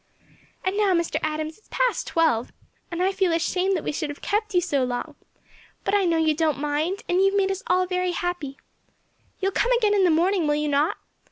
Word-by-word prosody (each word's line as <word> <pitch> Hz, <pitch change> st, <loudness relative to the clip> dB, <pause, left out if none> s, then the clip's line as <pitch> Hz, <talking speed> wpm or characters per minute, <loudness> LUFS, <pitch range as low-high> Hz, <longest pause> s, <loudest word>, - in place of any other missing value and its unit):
"And 375 Hz, +1 st, 0 dB
now, 400 Hz, -3 st, +3 dB
Mr. 340 Hz, -1 st, 0 dB
Adams, 310 Hz, +2 st, -3 dB
it's -, -, -30 dB
past -, -, 0 dB
twelve, 310 Hz, -9 st, +1 dB, 0.4 s
and 345 Hz, 0 st, -2 dB
I 380 Hz, -, +2 dB
feel 380 Hz, -2 st, +1 dB
ashamed 360 Hz, +3 st, +1 dB
that 320 Hz, -, -5 dB
we -, -, -1 dB
should 305 Hz, 0 st, -3 dB
have 290 Hz, -, -7 dB
kept 425 Hz, -1 st, -1 dB
you -, -, +6 dB
so 290 Hz, -7 st, 0 dB
long; 245 Hz, -1 st, -3 dB, 0.7 s
but -, -, -1 dB
I 405 Hz, -2 st, +3 dB
know 335 Hz, -2 st, +2 dB
you 320 Hz, -1 st, +3 dB
don't 310 Hz, -1 st, +1 dB
mind, 300 Hz, +6 st, -1 dB
and 355 Hz, -, +2 dB
you 385 Hz, -, +5 dB
have 390 Hz, +1 st, +2 dB
made 390 Hz, -1 st, +2 dB
us 385 Hz, 0 st, -3 dB
all 365 Hz, +1 st, +3 dB
very 365 Hz, 0 st, -1 dB
happy. 350 Hz, -6 st, -3 dB, 0.8 s
You 390 Hz, -, +1 dB
will -, -, -7 dB
come 485 Hz, +5 st, +1 dB
again 440 Hz, -4 st, +3 dB
in 400 Hz, -2 st, +3 dB
the 360 Hz, -, +5 dB
morning, 340 Hz, +1 st, +2 dB
will 295 Hz, -, +2 dB
you 300 Hz, 0 st, -1 dB
not? 290 Hz, +2 st, +1 dB
355 Hz, 230 wpm, -24 LUFS, 310-390 Hz, 0.8 s, you